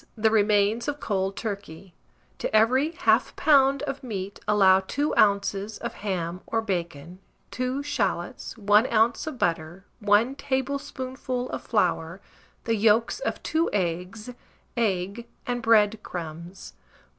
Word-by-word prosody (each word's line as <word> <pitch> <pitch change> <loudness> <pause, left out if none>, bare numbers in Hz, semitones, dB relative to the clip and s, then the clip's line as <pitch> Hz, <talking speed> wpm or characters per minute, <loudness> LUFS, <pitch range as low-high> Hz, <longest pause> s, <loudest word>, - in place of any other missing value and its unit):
The 220 -1 +2
remains 210 +1 +2
of 290 0 -2
cold 195 -1 -1
turkey; 195 -4 -6 0.5
to - - -2
every 255 +8 +4
1/2 - - +2
lb. 275 -2 +4
of 275 -1 -4
meat 200 -5 -5
allow 195 -3 +5
2 285 +10 -2
oz. 200 0 +2
of - - -5
ham 180 -3 -4
or 225 - 0
bacon, 175 -5 -4 0.3
2 255 +3 -2
shalots, 195 -12 -3
1 210 +2 +4
oz. 230 +5 +2
of 305 -5 -5
butter, 170 0 -2
1 210 +4 +3
tablespoonful 260 -2 -3
of - - -4
flour, 175 -4 0 0.4
the 230 - 0
yolks 220 - +2
of - - -4
2 325 +2 +1
eggs, 185 +5 -3 0.4
egg 205 0 -1 0.2
and 245 -1 -2
bread 220 -2 +4
crumbs. 170 - -8
210 Hz, 130 wpm, -26 LUFS, 190-250 Hz, 0.5 s, allow